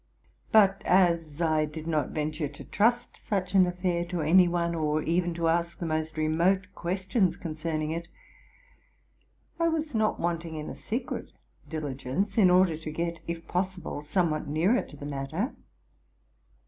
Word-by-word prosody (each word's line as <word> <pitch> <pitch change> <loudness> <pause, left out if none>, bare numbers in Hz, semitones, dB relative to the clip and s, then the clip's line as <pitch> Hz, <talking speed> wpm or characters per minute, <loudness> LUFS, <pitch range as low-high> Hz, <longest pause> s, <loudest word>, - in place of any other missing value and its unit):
sut 195 -3 +5
as 170 -4 +2
I 155 -1 +2
did 155 +1 -8
not 155 -4 0
venture 155 0 -2
to 145 +1 -11
trust 235 +4 +1
such 190 -2 -2
an 185 -2 +6
affair 180 -1 -1
to 175 -1 -3
any 175 +4 +6
one, 170 -1 0
or 155 -1 0
even 170 +1 0
to 165 -1 0
ask 170 +1 +1
the 175 - -4
most 155 0 -2
remote 170 +5 +2
questions 185 +1 0
concerning 155 -1 -3
it, 170 +1 -4 1.5
I 335 - +3
was 315 -2 -1
not 220 -1 +1
wanting 170 -1 -2
in 155 -1 -5
a - - -6
secret 235 +4 -4 0.4
diligence, 150 +5 -3
in 190 -4 +7
order 180 -3 +4
to 160 0 -7
get, 170 +2 -3
if 170 0 -5
pos 185 +1 -1
sible, 150 -4 -6
somewhat 155 0 0
nearer 170 - +2
to 145 - -12
the 145 - -8
matter. 145 - -3
170 Hz, 160 wpm, -28 LUFS, 155-185 Hz, 1.5 s, in